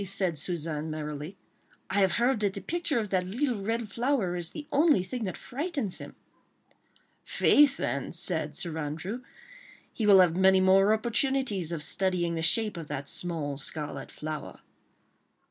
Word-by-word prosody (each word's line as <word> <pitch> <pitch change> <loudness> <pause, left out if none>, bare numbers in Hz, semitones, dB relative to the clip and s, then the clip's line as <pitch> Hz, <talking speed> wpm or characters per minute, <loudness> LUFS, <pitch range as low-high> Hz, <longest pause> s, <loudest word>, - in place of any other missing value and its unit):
said 190 -5 -1
Suzanne, 160 -2 -3
merrily. 150 +3 -5 0.5
"I 200 - 0
have 190 -3 +3
heard 240 0 +2
that 205 -2 0
the 200 - -4
picture 340 -5 -1
of 215 -3 -2
that 180 -1 +1
little 240 +1 -1
red 225 +2 -2
flower 235 -6 0
is 175 -2 -2
the 300 - -8
only 295 - +4
thing 225 +4 -4
that 185 - -4
frightens 280 - -3
him." - - -10 1.1
"Faith, 285 -2 +4
then," 140 - -2
said 160 -3 0
Sir 170 0 -3
Andrew, 160 +10 -4 0.7
"he 220 - -1
will 195 -2 +8
have 170 -2 +3
many 190 +1 +5
more 190 +2 +5
opportunities 220 - +1
of 160 -3 -2
studying 180 -1 0
the 165 - -2
shape 210 +4 +2
of 165 -2 -7
that 140 0 -5
small 155 -5 -3
scarlet 150 +1 -4
flower." 155 -1 -6
190 Hz, 160 wpm, -28 LUFS, 165-230 Hz, 1.1 s, will